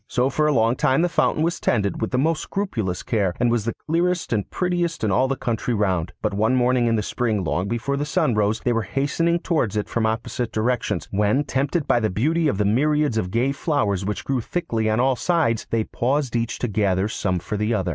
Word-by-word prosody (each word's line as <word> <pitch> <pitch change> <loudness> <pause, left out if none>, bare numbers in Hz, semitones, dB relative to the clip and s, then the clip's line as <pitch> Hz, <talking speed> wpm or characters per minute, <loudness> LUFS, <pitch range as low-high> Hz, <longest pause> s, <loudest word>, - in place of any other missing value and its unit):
So 125 +3 +1
for 155 0 +1
a - - +3
long 115 -2 +2
time 135 +6 +2
the 175 - +2
fountain 155 - +1
was 170 +2 -1
tended 100 -5 0
with 110 - 0
the 125 - -1
most 155 +4 +1
scrupulous 110 - -3
care, 100 -6 0
and 120 - +2
was 115 -3 0
the 115 - -2
clearest 175 -1 0
and 105 -3 -1
prettiest 175 -4 -1
in 105 - +1
all 130 +6 +3
the 135 - -1
country 120 -1 -2
round. 95 -5 0
But - - 0
one 110 +5 +2
morning 125 -1 +2
in 115 - +2
the 105 - 0
spring, 110 -3 -1
long 90 +3 -1
before 120 +5 -2
the 145 - -1
sun 150 -4 +1
rose, 105 0 +1
they 120 - +1
were 115 - +1
hastening 145 - 0
towards 155 - -1
it 105 - -1
from 115 -1 0
opposite 115 +1 -2
directions, 120 +3 -1
when, 105 +7 +2
tempted 140 +3 -1
by 120 - +3
the 110 -2 0
beauty 155 - +1
of 120 - 0
the 105 - +1
myriads 145 +3 +2
of 90 -4 -3
gay 120 +7 +1
flowers 140 - 0
which 105 +1 -3
grew 135 -3 0
thickly 115 -7 -2
on 110 +2 +1
all 130 +1 +3
sides, 140 -7 0
they 115 -1 +1
paused 130 +2 -1
each 115 0 -1
to 125 - -2
gather 100 -2 +1
some 95 -4 -1
for 90 +4 -4
the 105 +2 -1
other. 95 -3 -1
120 Hz, 235 wpm, -23 LUFS, 105-145 Hz, -, a